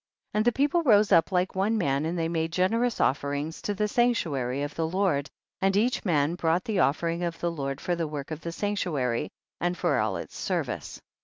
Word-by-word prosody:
32. - - -1
And 215 - +2
the 240 - +5
people 285 +7 +2
rose 210 -8 +4
up 170 0 +5
like 180 0 +1
one 200 +4 +1
man 140 -6 +1
and 175 +2 -2
they 165 -1 0
made 165 -1 -1
generous 225 +7 +1
offerings 145 +3 -1
to 205 - -2
the 210 +1 0
sanctuary 155 - 0
of 145 +1 -4
the 165 -1 -1
Lord, 170 -5 0 0.3
and 195 +1 +2
each 240 +4 +1
man 155 -4 +2
brought 170 +1 +1
the 210 -4 -1
of 140 -3 +3
fering 170 0 -2
of 170 -1 -3
the 170 - -1
Lord 140 -3 -4
for 175 - -1
the 165 -2 -2
work 145 -1 -6
of 155 0 -5
the 170 - -4
sanctuary, 165 - -1 0.3
and 175 +1 -1
for 175 - +1
all 105 -3 0
its 85 - -8
service. - - -3
170 Hz, 220 wpm, -27 LUFS, 145-205 Hz, 0.3 s, the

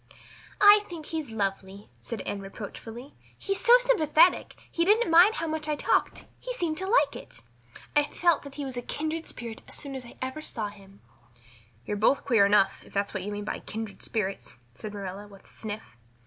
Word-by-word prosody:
"I 410 +1 +9
think 330 -4 -8
he's 315 -4 -4
lovely," 200 -2 -3
said 230 -4 -6
Anne 205 - -4
reproachfully. 225 +6 -9 0.2
"He 395 - -5
is 395 - +2
so 485 -1 +5
very - - +3
sympathetic. 315 +3 +4 0.2
He 335 - +1
didn't 420 +1 +3
mind 360 +7 +7
how 330 - -2
much 310 -1 -3
I 300 - 0
talked - - 0
he - - -6
seemed 340 -9 -1
to 380 - -3
like 475 +5 +3
it. - - -10 0.5
I 295 0 +5
felt 345 +1 +2
that 280 -1 -11
he 290 - -4
was 260 -1 -6
a 245 - -3
kindred 315 +5 -4
spirit 230 -2 -6
as - - -8
soon 280 -2 -4
as 260 -2 -6
ever 260 +3 -4
I - - -7
saw 225 -8 -3
him." 200 -1 -17 0.8
"You're 205 - -2
both 220 +7 +2
queer 225 -7 +5
enough, 200 -1 +3
if - - -18
that's 200 0 -1
what 190 - -3
you 205 +3 -5
mean 205 0 -5
by - - -3
kindred 220 -2 -7
spirits," 195 - -3 0.2
said 210 - -8
Marilla 200 0 -7
with 200 -1 -16
a - - -22
sniff. 215 - -8
250 Hz, 205 wpm, -27 LUFS, 205-320 Hz, 0.8 s, I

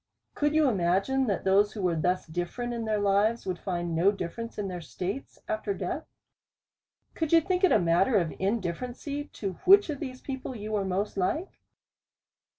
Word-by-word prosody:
Could 295 +1 0
you 310 -2 +5
imagine, 200 +6 +1
that 200 - -1
those 200 +2 +3
who 205 - -5
were 175 -2 +2
thus 180 +3 0
different 175 +9 -3
in 230 -1 -3
their 215 -1 0
lives, 205 +3 +2
would 180 -2 -3
find 175 -2 -3
no 175 +5 +4
difference 210 +4 -6
in 205 -2 -2
their 180 -2 -5
states 185 - -5
after 215 -2 -2
death? 190 - -4 1.1
Could 320 -2 -2
you 335 - +8
think 365 +2 -1
it 375 - +6
a - - +6
matter 180 +5 +3
of 170 -4 0
indifference 200 +4 -2
to 285 -8 -4
which 395 -2 +7
of 285 - -5
these 255 -3 -6
people 265 -1 -5
you 215 -1 -6
were 205 -2 0
most 195 +2 -2
like 300 - -1
205 Hz, 180 wpm, -28 LUFS, 185-260 Hz, 1.1 s, you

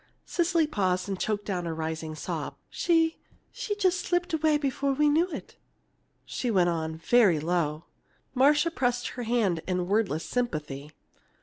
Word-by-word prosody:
Cecily 340 -2 +2
paused 185 -10 0
and 195 -2 -3
choked 205 -1 -1
down 180 -4 -2
a 165 - -3
rising 160 0 -4
sob. 155 - -4 0.2
"She 330 -1 +2 0.3
she 415 - -3
just 375 -3 +2
slipped 350 0 -1
away 310 -1 +3
before 280 -1 0
we 300 +2 +3
knew 325 +5 +3
it," - - -8 0.7
she 250 - -3
went 185 -5 +3
on, 160 -1 -2
very 190 -2 +4
low. 160 -1 -1 0.5
Marcia 295 +5 +4
pressed 245 -5 0
her 245 - -6
hand 205 -9 +2
in 180 -1 -1
wordless 195 -6 0
sympathy. 150 - -3
220 Hz, 150 wpm, -28 LUFS, -, 0.7 s, very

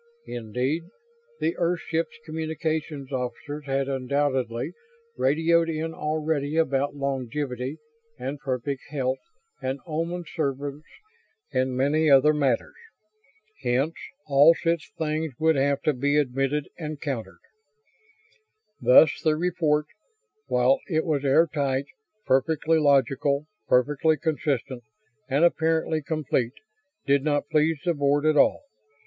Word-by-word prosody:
Indeed, 125 +8 -2 0.5
the 165 - 0
Earthship's 165 -2 -1
communications 155 -3 -3
officers 140 +3 -4
had 135 0 0
undoubtedly 130 -3 -1 0.4
radioed 165 +4 +2
in 160 0 -3
already 155 -1 -1
about 140 -3 +1
longevity 135 0 -3 0.4
and 135 +3 -5
perfect 135 0 -3
health 135 -2 -1 0.4
and 130 +1 -2
Oman 170 +2 -3
service 145 -2 -3 0.7
and 130 0 0
many 150 +4 +2
other 140 +2 +6
matters. 135 -6 0 0.9
Hence 130 +5 +1 0.3
all 145 +3 +6
such 165 -1 -1
things 155 -2 -2
would 160 0 +3
have 140 0 +1
to 155 - +2
be 145 +3 +1
admitted 135 +1 0
and 155 -2 -5
countered. 120 - -4 1.4
Thus 140 +4 +6
the 155 -1 +3
report, 160 -3 +1 0.6
while 125 +2 +3
it 160 -2 +1
was 150 -4 0
air 145 +4 +5
tight, 140 -4 -1 0.4
perfectly 160 +4 +2
logical, 140 0 +2 0.2
perfectly 150 +5 +3
consistent, 140 -5 -2 0.5
and 140 +5 +4
apparently 160 -1 +1
complete, 140 -5 -1 0.5
did 140 0 +3
not 145 -1 0
please 155 +1 +3
the 175 - +2
Board 145 0 +1
at 155 0 +4
all. 145 - +4
145 Hz, 115 wpm, -25 LUFS, 135-160 Hz, 1.4 s, other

